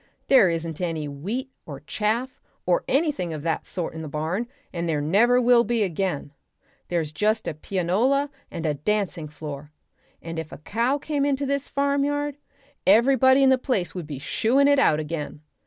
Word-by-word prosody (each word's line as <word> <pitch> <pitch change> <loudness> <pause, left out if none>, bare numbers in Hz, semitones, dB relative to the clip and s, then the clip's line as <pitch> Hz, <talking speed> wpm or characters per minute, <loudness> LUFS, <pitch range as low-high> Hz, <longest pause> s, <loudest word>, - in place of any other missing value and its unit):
There 255 -9 +7
isn't 165 0 -3
any 165 -4 -2
wheat 200 - -4 0.2
or 140 -3 -8
chaff 220 - -2 0.2
or 180 -1 +2
anything 275 - 0
of 150 -2 -6
that 165 -1 -2
sort 175 -3 -4
in 160 - -6
the 155 - -6
barn, 160 +10 -2 0.3
and 170 -1 -2
there 155 -2 +1
never 210 +12 +4
will 245 -1 +5
be 235 -2 +1
again: 180 -6 -2 0.6
there's 165 -4 -1
just 215 +8 0
a - - -1
pianola 200 - 0 0.2
and 165 - -5
a 150 - +1
dancing 180 +1 -1
floor, 150 -1 -8 0.5
and 165 0 -6
if 160 -1 -7
a - - -8
cow 230 - 0
came 290 -1 -2
into 280 0 0
this 280 0 -1
farmyard 285 +1 0 0.5
everybody 260 +5 +5
in 265 - +6
the 260 - +4
place 200 - -1
would 175 -5 -6
be 145 -3 -5
shooing 235 - +2
it 285 -1 +4
out 155 - +4
again. 150 -1 -5
195 Hz, 175 wpm, -24 LUFS, 160-260 Hz, 0.6 s, There